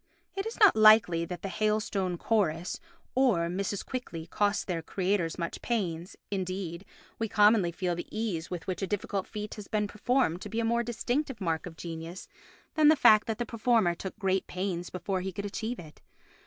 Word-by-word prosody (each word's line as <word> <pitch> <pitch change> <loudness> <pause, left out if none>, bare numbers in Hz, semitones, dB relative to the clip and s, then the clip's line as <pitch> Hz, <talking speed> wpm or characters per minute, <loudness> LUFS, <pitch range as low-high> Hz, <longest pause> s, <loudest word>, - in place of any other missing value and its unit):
It 390 +2 -2
is 455 - -7
not 415 -3 +7
likely 215 -6 +6
that 175 +1 -7
the - - -2
"Hailstone 205 -2 0
Chorus" 175 -5 0 0.3
or 235 -11 +3
Mrs. 195 +2 -2
Quickly 210 -11 -5
cost 205 +3 0
their 175 -3 -2
creators 185 -1 -1
much 170 -2 -4
pains, 180 -7 -2 0.2
indeed, 185 -2 -3 0.3
we 225 -1 -1
commonly 210 -4 +4
feel 180 +1 -1
the 175 0 -5
ease 205 -7 -3
with 175 -2 -5
which 185 +1 -3
a 195 - -1
difficult 200 -1 -2
feat 210 0 -6
has 210 -2 -9
been 210 -1 0
performed 210 -4 0
to - - -6
be 225 - -2
a 230 - +1
more 235 +1 +2
distinctive 245 +2 -2
mark 165 -3 -1
of 165 -2 -10
genius 165 +1 -7 0.5
than 310 -1 +5
the 310 - +8
fact 215 -7 +6
that 225 -2 -2
the 240 - -2
performer 225 -5 +2
took 190 +4 -7
great 190 -3 0
pains 180 -1 -3
before 185 +1 -2
he 190 +1 -3
could 200 +3 -5
achieve 220 +4 -3
it. 155 -3 -12
195 Hz, 190 wpm, -29 LUFS, 175-220 Hz, 0.5 s, the